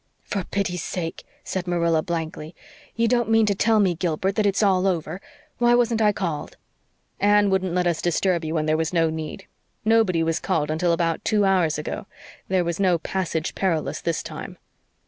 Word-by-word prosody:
"For 200 -2 -3
pity's 180 -3 -2
sake!" 165 -1 -5 0.2
said 185 -1 -4
Marilla 170 -2 +2
blankly. 160 -1 -5 0.4
"You 230 0 +2
don't 240 -1 +1
mean 225 0 +4
to 205 - +2
tell 220 +3 +2
me, 190 -4 +3
Gilbert, 170 +2 -1
that 210 0 +1
it's 200 +2 +1
all 190 -1 +3
over. 175 0 -2 0.4
Why 240 0 +5
wasn't 235 -2 +2
I 210 -1 +5
called?" 170 -7 -4 0.6
"Anne 205 0 +4
wouldn't 190 -2 0
let 180 0 +1
us 170 -2 0
disturb 175 0 +1
you 160 +1 -3
when 155 -1 0
there 155 0 +2
was 160 +1 -1
no 165 -2 +2
need. 160 +4 -6 0.4
Nobody 215 -7 +3
was 165 0 0
called 155 -5 -1
until 170 +2 +1
about 165 -1 0
two 210 -2 +2
hours 180 -6 +2
ago. 155 +5 -5 0.4
There 185 -1 +1
was 170 +1 -3
no 185 -3 +3
'passage 165 -2 -3
perilous' 170 -5 -1
this 165 -2 -1
time." - - -8
180 Hz, 185 wpm, -23 LUFS, 165-200 Hz, 0.6 s, Why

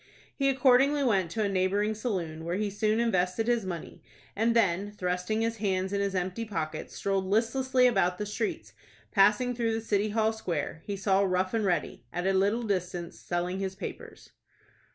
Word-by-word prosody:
He 275 -1 +2
accordingly 270 +2 +4
went 195 -9 +2
to 220 +5 -1
a - - +1
neighboring 200 +2 +1
saloon, 180 -8 -3
where 170 +2 -2
he 205 +1 -1
soon 215 +2 +1
invested 185 -2 +1
his 235 -5 +1
money, 170 -3 -6 0.3
and 230 +2 +2
then, 200 -3 +2
thrusting 180 +2 -2
his 230 0 -1
hands 190 -2 -1
in 200 - 0
his 200 -1 -1
empty 185 +5 -2
pockets, 155 -8 -4
strolled 195 -1 -1
listlessly 250 +5 +2
about 190 -7 +3
the 210 - -3
streets. 210 +2 -3 0.4
Passing 210 +5 +4
through 230 -2 0
the - - -1
City 210 -1 0
Hall 220 +1 +1
Square, 165 -7 -3
he 200 -1 -3
saw 195 0 +2
Rough 185 0 +1
and 225 -2 +1
Ready, 170 -9 -1
at 175 +5 -3
a 195 - +2
little 200 +5 +2
distance, 180 -4 -3
selling 180 +2 -2
his 190 -1 -3
papers. 195 - -8
200 Hz, 180 wpm, -29 LUFS, 185-225 Hz, 0.4 s, accordingly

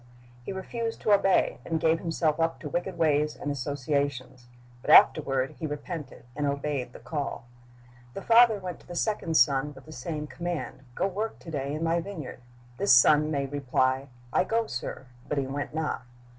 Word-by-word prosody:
He - - -5
refused 225 +4 -4
to 215 - +1
obey, 195 -1 +3
and 165 -1 -1
gave 160 +1 +2
himself 165 -2 0
up 165 0 0
to 150 - -5
wicked 175 +4 -3
ways 150 -2 +2
and 145 - -4
associations. 140 -2 -2 0.3
But - - -7
afterward 135 -3 +5
he 160 - -2
repented, 150 -1 -7
and 145 0 -1
obeyed 140 -3 -2
the - - -11
call. 145 -4 -4 0.7
The 195 - -6
father 230 -1 +6
went 180 -3 -6
to - - -20
the 175 - -7
second 175 -5 0
son 135 +2 +3
with 135 - -14
the 155 - -12
same 150 +2 -5
command, 170 -4 -5
"Go - - 0
work 210 +4 -3
to 165 - -9
day 140 -2 -3
in 155 - -3
my 165 +1 +1
vineyard." 165 -10 -7 0.4
This 200 - +4
son 150 +5 +6
made 140 -3 -2
reply, 130 -1 0 0.3
'T - - +4
go, 230 +2 +1
sir," 125 - -5 0.2
but 150 - -2
he 140 - +1
went 140 +3 -4
not. 160 -3 -2
150 Hz, 185 wpm, -27 LUFS, 140-175 Hz, 0.7 s, father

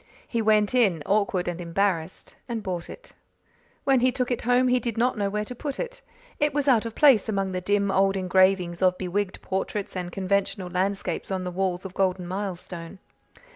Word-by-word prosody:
He 235 - -1
went 215 -1 +3
in, 200 -11 +3
awkward 195 -3 +1
and 175 0 -3
embarrassed, 175 -1 -2
and 230 -2 -3
bought 180 -3 -4
it. - - -12 0.7
When 270 -2 +4
he 255 +1 +3
took 250 0 -2
it 245 - -1
home 250 +2 +3
he 250 0 +3
did 235 -2 -4
not 245 +2 +2
know 200 -2 -1
where 210 +1 -2
to 250 - -7
put 275 +3 -5
it. - - -5 0.4
It 295 -1 +1
was 290 -1 0
out 235 -4 +4
of 225 - -8
place 265 -8 +5
among 195 -2 -1
the 185 0 -3
dim 200 +1 +1
old 195 0 +3
engravings 185 -1 +2
of 185 -1 +3
bewigged 190 +1 -2
portraits 195 +1 -3
and 180 -1 -4
conventional 190 -1 -1
landscapes 190 -1 -2
on 190 -1 -2
the 180 - -4
walls 185 0 -2
of 190 - -7
Golden 185 -2 0
Milestone. 180 -2 -5
195 Hz, 195 wpm, -25 LUFS, 185-230 Hz, 0.7 s, place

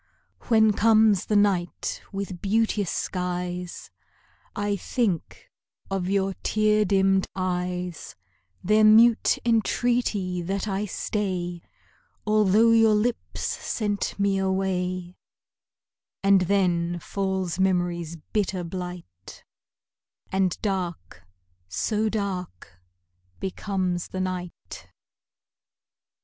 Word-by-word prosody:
When 220 -2 +5
comes 215 -2 +4
the 210 - +1
night 195 -4 +1
with 195 -3 -5
beauteous 210 -2 +1
skies, 180 -1 -4 0.6
I 205 0 -1
think 200 - -2 0.4
of 190 -1 -1
your 195 -1 +1
tear 215 0 +2
dimmed 195 -1 +2
eyes, 180 -2 -3 0.5
Their 215 +3 +4
mute 225 +2 +6
entreaty 225 -5 +1
that 195 +4 -3
I 200 +1 -1
stay, 180 -4 -3 0.6
Although 215 +1 +4
your 225 -1 +5
lips 225 +3 -2
sent 205 -2 -2
me 200 -1 +2
away; 185 -2 -1 1.1
And 195 -1 +5
then 175 -3 +1
falls 190 -1 -2
memory's 175 -3 0 0.2
bitter 195 -4 0
blight, 175 - -8 0.9
And 190 -2 0
dark 185 - -3 0.5
so 210 - -1
dark 180 - -5 0.6
becomes 185 -2 -2
the 185 - -4
night. 180 -1 -6
190 Hz, 90 wpm, -25 LUFS, 180-210 Hz, 1.1 s, mute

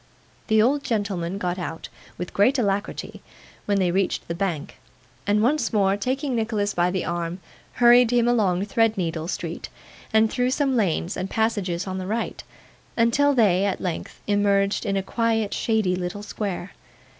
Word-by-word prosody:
The 220 0 +4
old 280 +4 +2
gentleman 195 -5 -2
got 180 -2 -2
out, 165 -2 -5 0.3
with 180 - -6
great 250 +8 +3
alacrity, 200 -4 -2 0.5
when 200 -1 +2
they 185 -2 +2
reached 190 +1 -1
the 170 - -2
Bank, 170 -4 -3 0.5
and 210 +1 +3
once 275 0 +1
more 195 -2 +3
taking 260 +5 -2
Nicholas 220 -3 -1
by 175 +1 +2
the 185 0 -2
arm, 170 +1 -3 0.3
hurried 240 0 +6
him 240 -1 +3
along 200 -6 +2
Threadneedle 190 -7 0
Street, - - -5 0.4
and 220 0 +4
through 250 -1 +1
some 270 0 +1
lanes 185 -4 0
and 185 +1 -3
passages 200 -6 -1
on 190 -1 -4
the 185 - -5
right, 225 +3 -3 0.5
until 275 +5 +3
they, 195 -6 +4
at 195 - -1
length, 180 -3 -5
emerged 200 0 +1
in 195 0 0
a 195 - -1
quiet 225 0 0
shady 215 -5 +1
little 180 +3 -4
square. 200 -3 -4
205 Hz, 160 wpm, -24 LUFS, 185-230 Hz, 0.5 s, hurried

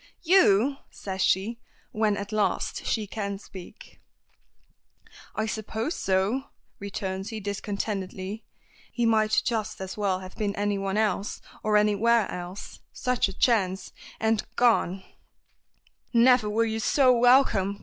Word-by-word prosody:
"You!" 280 - +4
says 190 -1 -6
she, 210 +7 +1 0.3
when 215 -1 +1
at 205 +1 -6
last 215 -1 -1
she 220 -2 0
can 200 -1 -4
speak. 195 - -13 1.3
"I 215 - 0
suppose 220 - -3
so," 195 +8 0 0.3
returns 195 -1 -4
he 220 -1 -5
discontentedly. 200 0 -4 0.5
He 240 - -1
might 215 -1 +3
just 220 -3 -2
as 190 +1 -6
well 195 -3 0
have 185 0 -10
been 205 -2 -2
anyone 200 -1 -1
else, 210 -2 0 0.2
or 215 -1 +3
anywhere 210 +1 +3
else 180 +2 -7
such 250 -3 0
a 195 - -9
chance 195 -6 +1 0.3
and 220 -1 +1
gone! 195 -6 +2 1.1
"Never 240 -2 +5
were 225 +2 +1
you 220 0 -2
so 255 +3 +4
welcome!" 235 -5 +4
210 Hz, 125 wpm, -26 LUFS, 195-230 Hz, 1.3 s, Never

